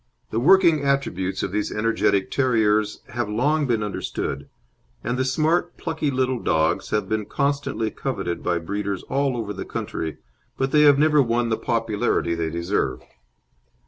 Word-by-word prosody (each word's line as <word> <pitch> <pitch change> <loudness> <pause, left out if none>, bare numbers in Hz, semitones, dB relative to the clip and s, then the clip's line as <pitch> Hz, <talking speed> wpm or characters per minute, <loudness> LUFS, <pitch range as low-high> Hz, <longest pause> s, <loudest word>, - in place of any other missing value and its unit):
The 110 - 0
working 170 +1 +5
attributes 95 -10 -1
of - - -2
these 105 +1 -1
energetic 105 -3 +1
terriers 110 -5 +2
have 120 -3 -3
long 145 +7 +1
been 115 -3 +1
understood, 70 -8 -4 0.5
and 120 +2 -1
the 130 - 0
smart, 160 +6 +1
plucky 160 -3 -2
little 130 -2 0
dogs 80 -5 +1
have 105 -1 0
been 110 -1 -2
constantly 140 -6 -1
coveted 95 -10 -3
by 85 -1 0
breeders 100 +3 -3
all 135 -2 0
over 105 -3 -3
the - - -5
country, 80 -2 -4 0.4
but 135 0 0
they 150 - +5
have 145 -2 +7
never 150 0 +4
won 120 -1 +1
the 110 - +2
popularity 115 -6 0
they 85 -1 -1
deserve. 85 -7 -1
115 Hz, 155 wpm, -23 LUFS, 100-140 Hz, 0.5 s, have